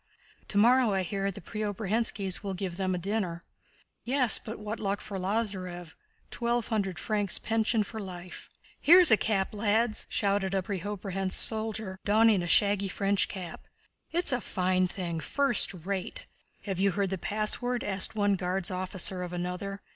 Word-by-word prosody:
"Tomorrow, 235 +2 +4
I 190 - +1
hear, 195 +2 -2
the 195 - -8
Preobrazhénskis 210 0 -1
will 195 -2 -4
give 180 -2 -4
them 185 -1 0
a - - -2
dinner." 180 -2 -2 0.6
"Yes, 255 -1 +4
but 220 - -7
what 210 +1 -5
luck 200 0 -1
for 195 -2 -6
Lázarev! 185 -4 -3 0.4
Twelve 235 0 -1
hundred 195 -6 -1
francs' 205 +2 0
pension 225 0 +1
for 220 +2 -8
life." 180 -3 -9 0.3
"Here's 350 -1 +7
a - - +9
cap, 205 -2 -1
lads!" 215 +2 +1
shouted 200 -1 0
a 190 - 0
Preobrazhénsk 195 0 -3
soldier, 220 -3 +1
donning 215 -1 +4
a 175 - -3
shaggy 200 +2 +3
French 195 +1 0
cap. 180 -4 -8 0.4
"It's 345 -2 +2
a 250 -1 0
fine 185 -1 +1
thing! 175 -3 -4
First 270 - +1
rate!" 185 +1 -4 0.4
"Have 195 -3 -3
you 195 -1 +2
heard 200 -1 -1
the 190 - -2
password?" 215 +5 -1
asked 195 +1 +2
one 205 -1 +2
Guards' 185 +1 -2
officer 185 0 -2
of 180 -1 -5
another. 180 +3 -4
200 Hz, 155 wpm, -29 LUFS, 185-220 Hz, 0.6 s, a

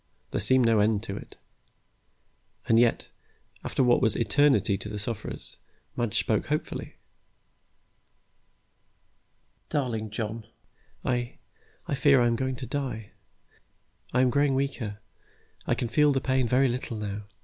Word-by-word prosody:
There - - -1
seemed 130 -1 +4
to 115 - +4
be - - +5
no 110 - +4
end 105 0 +2
to 100 -4 -5
it. - - -10 1.3
And 115 - +5
yet, 120 -1 +2 0.5
after - - 0
what 120 -1 +4
was 110 -1 +2
eternity 115 -5 +3
to 105 - -6
the 105 - -5
sufferers, 105 +1 -5 0.4
Madge 120 -4 -1
spoke - - +1
hopefully. - - -3 2.7
"Darling 115 -7 -1
John, 110 +1 -4 0.6
I 120 -1 -1 0.5
I - - -3
fear 140 -1 +5
I 120 - +4
am 120 - +3
really - - -1
going 130 -1 -1
to 130 - -6
die. 125 -6 -4 1.0
I 125 - +3
am 130 -1 +3
growing 140 0 +2
weaker. 130 -6 -2 0.7
I - - +2
can 120 - -2
feel 150 +5 +4
the 135 - +1
pain 130 -1 +1
very 130 +3 +3
little 120 -2 -3
now. 105 -1 -5
120 Hz, 150 wpm, -27 LUFS, 110-130 Hz, 2.7 s, be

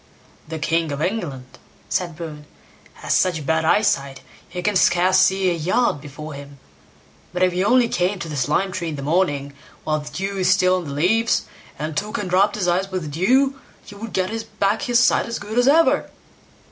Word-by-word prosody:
"The 160 +1 -5
king 165 0 0
of 140 - -4
England", 150 - -4 0.3
said 175 -3 -2
Bruin, 155 -3 -8 0.5
"has - - -2
such 160 -5 +1
bad 160 +2 +1
eyesight, 150 -9 +1 0.3
he 180 0 -6
can 210 +1 0
scarce 185 +1 +4
see 190 0 +3
a - - +1
yard 170 - 0
before 150 +2 -9
him; 140 0 -10 0.7
but 180 +1 0
if 180 -1 +3
he 180 +1 0
only 245 +3 +4
came 185 -1 0
to 170 - -6
this 145 -4 -2
lime 190 +6 +1
tree 170 -2 -3
in 155 - -4
the 140 - -6
morning, 145 -3 0 0.3
while 155 0 0
the 150 - -8
dew 195 +1 -4
is 185 0 +3
still 185 0 +3
on 180 - -5
the - - -6
leaves, 225 +10 +2 0.3
and 155 0 -4
took 210 +5 -2
and 190 -5 -4
rubbed 195 +3 +3
his 195 -4 -1
eyes 185 +3 +1
with 185 -2 -3
the 150 - -6
dew, 260 - +2 0.3
he - - -11
would 210 +2 -8
get 220 +4 -3
back 200 +2 +2
his 240 -1 +1
sight 245 - +3
as 230 - -3
good 215 +3 -2
as 245 - +3
ever." 325 +4 +4
180 Hz, 205 wpm, -21 LUFS, 155-205 Hz, 0.7 s, scarce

